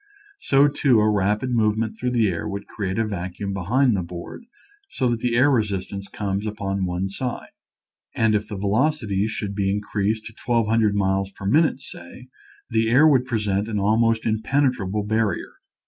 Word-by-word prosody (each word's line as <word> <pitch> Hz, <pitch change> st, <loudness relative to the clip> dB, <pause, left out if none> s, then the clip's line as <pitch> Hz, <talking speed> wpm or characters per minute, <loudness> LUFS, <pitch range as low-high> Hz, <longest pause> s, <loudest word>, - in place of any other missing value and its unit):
So, 140 Hz, +1 st, +4 dB
too, 135 Hz, -4 st, +3 dB
a 105 Hz, -, +3 dB
rapid 105 Hz, +4 st, +1 dB
movement 110 Hz, -1 st, +1 dB
through 125 Hz, +3 st, -2 dB
the 120 Hz, -3 st, +2 dB
air 85 Hz, -4 st, -3 dB
would 100 Hz, 0 st, -5 dB
create 95 Hz, -1 st, -4 dB
a 115 Hz, -, +1 dB
vacuum 100 Hz, 0 st, -4 dB
behind 115 Hz, +6 st, +2 dB
the 95 Hz, -, -1 dB
board 85 Hz, -, -8 dB, 0.4 s
so 130 Hz, -, 0 dB
that 120 Hz, -1 st, -1 dB
the 120 Hz, 0 st, 0 dB
air 130 Hz, +4 st, +4 dB
resistance 100 Hz, -4 st, -2 dB
comes 100 Hz, +1 st, -3 dB
upon 100 Hz, -2 st, -2 dB
one 90 Hz, +1 st, -2 dB
side. 120 Hz, +5 st, -5 dB, 0.6 s
And 110 Hz, -1 st, +2 dB
if 105 Hz, 0 st, 0 dB
the 105 Hz, -, -6 dB
velocity 105 Hz, -1 st, 0 dB
should 105 Hz, -2 st, -4 dB
be 100 Hz, -1 st, 0 dB
in 100 Hz, +1 st, 0 dB
creased 105 Hz, +1 st, -2 dB
to 110 Hz, -, -9 dB
1,200 115 Hz, -3 st, +2 dB
miles 95 Hz, -1 st, 0 dB
per 100 Hz, -, -11 dB
minute, 145 Hz, +5 st, +2 dB
say, 125 Hz, +2 st, -11 dB, 0.4 s
the 110 Hz, 0 st, +2 dB
air 140 Hz, +7 st, +6 dB
would 130 Hz, -4 st, +3 dB
present 105 Hz, -4 st, -1 dB
an 105 Hz, -2 st, -2 dB
almost 110 Hz, +2 st, +2 dB
impenetrable 110 Hz, -3 st, 0 dB
barrier. 110 Hz, 0 st, -1 dB
105 Hz, 175 wpm, -23 LUFS, 100-120 Hz, 0.6 s, air